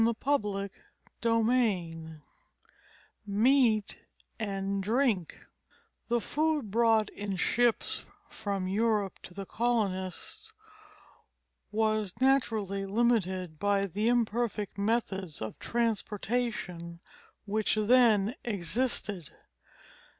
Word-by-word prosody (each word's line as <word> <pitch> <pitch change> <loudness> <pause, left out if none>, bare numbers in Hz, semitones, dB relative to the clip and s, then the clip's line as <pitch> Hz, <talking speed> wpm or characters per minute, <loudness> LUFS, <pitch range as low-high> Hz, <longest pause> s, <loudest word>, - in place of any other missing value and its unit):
CHAPTER 205 -8 0 0.5
VII 205 -10 +1 1.1
MEAT 220 0 +3 0.4
AND 195 -2 -2
DRINK 215 - 0 0.6
The 240 0 +2
food 300 -2 0
brought 225 -1 +3
in 200 -1 -4
ships 240 +5 +1 0.2
from 200 -3 -3
Europe 210 -1 0
to 180 - -12
the 195 - -5
colonists 210 - -2 1.2
was 215 -2 +1
naturally 220 -7 +1
limited 190 -7 +1
by 200 0 +2
the 205 +4 -1
imperfect 235 -3 0
methods 200 -6 -1
of 110 - -6
transportation 215 -6 -2 0.5
which 215 +1 +1
then 215 -1 +4
existed. 200 - -1
210 Hz, 80 wpm, -30 LUFS, 195-235 Hz, 1.2 s, then